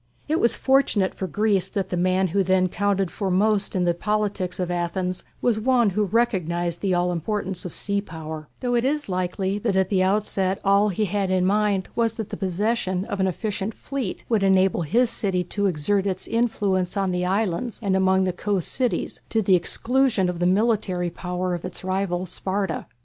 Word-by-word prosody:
It 315 +2 +1
was 235 - +3
fortunate 265 -8 +2
for 190 - -4
Greece 200 +2 +1
that 195 -2 -3
the - - -2
man 185 +1 +2
who 195 +4 +1
then 185 0 +2
counted 195 -1 0
for 195 +1 -3
most 200 +2 +2
in 185 - +1
the 175 - +3
politics 200 -1 -2
of 180 -1 -1
Athens 180 +1 -2 0.2
was 235 -3 +2
one 240 -2 +3
who 210 +3 +1
recognized 175 -6 0
the 190 -3 +1
all 175 0 +1
importance 185 +1 -3
of 180 - -4
sea 200 +4 -1
power, 160 -4 -8
though 245 -1 0
it 235 -1 +2
is 290 -1 -1
likely 190 +2 -1
that 210 -2 0
at 190 -1 +2
the 190 -2 +2
outset 195 -1 +1
all 200 +2 +4
he 210 +3 0
had 200 0 -1
in 185 -1 +2
mind 200 -1 +1
was 230 -1 +1
that 220 -3 -5
the - - -4
possession 190 0 -1
of 200 - -4
an 190 - +2
efficient 205 +3 -3
fleet 270 -9 -5
would 225 -4 +2
enable 190 -2 +3
his 230 +9 +2
city 185 -3 -1
to 200 +3 -1
exert 190 +4 0
its 185 -1 -3
influence 200 -5 0
on 195 -1 +1
the 180 0 -1
islands 195 +3 -1
and 195 -2 +1
among 190 0 +3
the 185 -1 0
coast 195 -1 -1
cities 250 -2 -1
to 225 - +1
the 190 - +3
exclusion 225 +2 +1
of 175 -1 -4
the 175 - +2
military 190 -3 +1
power 180 +1 -3
of 175 - -4
its 185 0 -6
rival 185 -1 -1
Sparta. 190 -1 -3
190 Hz, 200 wpm, -24 LUFS, 180-210 Hz, 0.2 s, all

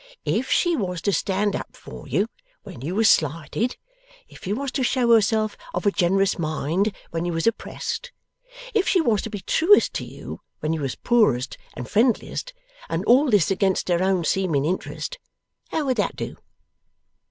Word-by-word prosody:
If - - 0
she 350 -2 +3
was 180 - -2
to 200 - +1
stand 200 +2 0
up - - -6
for - - -11
you - - +1 0.4
when 120 - -10
you 165 +7 -3
was 220 +1 +4
slighted, 165 - +1 0.5
if - - -15
she 190 - -3
was 265 +5 -2
to 265 - -1
show 245 -1 +2
herself 215 0 +3 0.2
of - - -2
a 205 - +4
generous 195 0 +2
mind 160 +6 0 0.2
when 165 0 -2
you 175 - -1
was 165 0 -1
oppressed, 355 - -2 0.6
if 415 -3 +2
she 370 - +4
was 230 - +2
to - - -5
be 205 -3 -6
truest 360 - +4
to - - -3
you - - -9 0.2
when 155 +1 -1
you 160 - -2
was 135 -3 -2
poorest 210 - +2 0.2
and 125 0 -6
friendliest, 240 - +1 0.4
and - - -2
all 265 +4 +5
this 200 -6 +3
against 190 -1 +1
her 175 0 +2
own 190 -2 +2
seeming 165 -6 +1
interest, 190 - -3 0.5
how 315 - -1
would 260 -2 0
that - - 0
do?" - - -5
200 Hz, 180 wpm, -24 LUFS, 170-240 Hz, 0.6 s, all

